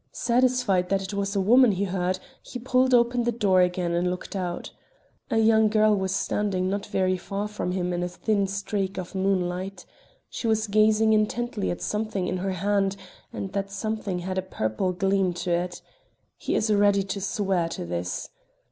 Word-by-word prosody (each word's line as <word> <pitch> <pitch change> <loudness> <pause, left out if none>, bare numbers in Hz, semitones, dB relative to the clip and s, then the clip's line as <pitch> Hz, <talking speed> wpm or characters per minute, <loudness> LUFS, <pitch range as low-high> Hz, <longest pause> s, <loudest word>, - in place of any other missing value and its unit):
Satisfied 240 -7 +2
that 195 -1 +1
it 190 - -6
was 200 0 -2
a - - +2
woman 235 +3 +5
he 190 +1 -1
heard, 185 -1 -1 0.2
he - - -8
pulled 255 +1 +2
open 240 0 +3
the 240 - +1
door 200 -5 +3
again 180 -1 0
and 175 +1 +1
looked 180 +2 -5
out. 180 -2 -4 0.6
A 230 - +1
young 220 0 +5
girl 215 0 +4
was 190 -1 -1
standing 195 -1 0
not 200 +1 -2
very 185 -1 +1
far 200 +3 -4
from 210 -3 -3
him 180 -1 -1
in 175 - -1
a 175 - -1
thin 200 +2 0
streak 195 0 -3
of 185 0 -6
moonlight. 190 -1 -1 0.4
She 230 - -4
was 220 -1 +2
gazing 215 +1 +4
intently 215 0 0
at 175 - -4
something 210 -3 -2
in 185 - -1
her 190 +1 -2
hand, 195 +1 0 0.4
and 195 - -5
that 195 -1 -2
something 205 -1 -3
had 185 +1 -2
a - - 0
purple 180 - -2
gleam 190 0 +1
to 175 +1 -3
it. 175 +1 -2 0.5
He - - -2
is 215 0 +2
ready 200 -1 +4
to 195 +1 -4
swear 190 -4 0
to 125 - -5
this. 85 +1 -4
195 Hz, 185 wpm, -25 LUFS, 185-215 Hz, 0.6 s, woman